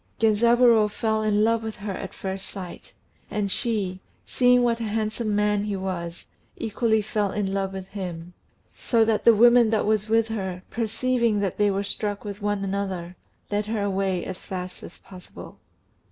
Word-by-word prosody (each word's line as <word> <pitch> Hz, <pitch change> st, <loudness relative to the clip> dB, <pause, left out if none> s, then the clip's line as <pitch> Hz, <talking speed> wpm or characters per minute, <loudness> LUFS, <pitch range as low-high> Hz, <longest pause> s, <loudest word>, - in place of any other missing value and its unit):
Genzaburô 230 Hz, 0 st, +5 dB
fell 220 Hz, +1 st, -1 dB
in 210 Hz, -1 st, +2 dB
love 230 Hz, 0 st, +2 dB
with 220 Hz, -1 st, -5 dB
her 205 Hz, 0 st, -5 dB
at 190 Hz, 0 st, -6 dB
first 190 Hz, 0 st, -5 dB
sight; 185 Hz, -3 st, -9 dB, 0.4 s
and 205 Hz, -2 st, -2 dB
she, 200 Hz, -6 st, -1 dB, 0.3 s
seeing 250 Hz, -1 st, +4 dB
what 235 Hz, -1 st, +1 dB
a -, -, -3 dB
handsome 215 Hz, 0 st, -1 dB
man 210 Hz, 0 st, +1 dB
he 205 Hz, -1 st, -2 dB
was, 180 Hz, -3 st, -5 dB, 0.3 s
equally 220 Hz, -1 st, +1 dB
fell 205 Hz, -1 st, -1 dB
in 195 Hz, -2 st, -2 dB
love 195 Hz, -1 st, -1 dB
with 190 Hz, -1 st, -7 dB
him; 180 Hz, -3 st, -6 dB, 0.4 s
so 230 Hz, -2 st, +2 dB
that 220 Hz, -1 st, 0 dB
the 230 Hz, -, +8 dB
woman 240 Hz, +1 st, +6 dB
that 220 Hz, -1 st, +1 dB
was 215 Hz, 0 st, +1 dB
with 225 Hz, 0 st, +3 dB
her, 190 Hz, -4 st, -4 dB
perceiving 230 Hz, 0 st, 0 dB
that 195 Hz, -1 st, -2 dB
they 205 Hz, 0 st, +4 dB
were 200 Hz, 0 st, -1 dB
struck 205 Hz, +1 st, -3 dB
with 205 Hz, 0 st, -6 dB
one 205 Hz, -1 st, -1 dB
another, 190 Hz, -3 st, -3 dB, 0.4 s
led 205 Hz, 0 st, 0 dB
her 215 Hz, -2 st, -1 dB
away 195 Hz, -2 st, -1 dB
as 185 Hz, -1 st, -6 dB
fast 180 Hz, -2 st, -6 dB
as -, -, -11 dB
possible. 185 Hz, -2 st, -12 dB
210 Hz, 175 wpm, -25 LUFS, 195-225 Hz, 0.4 s, the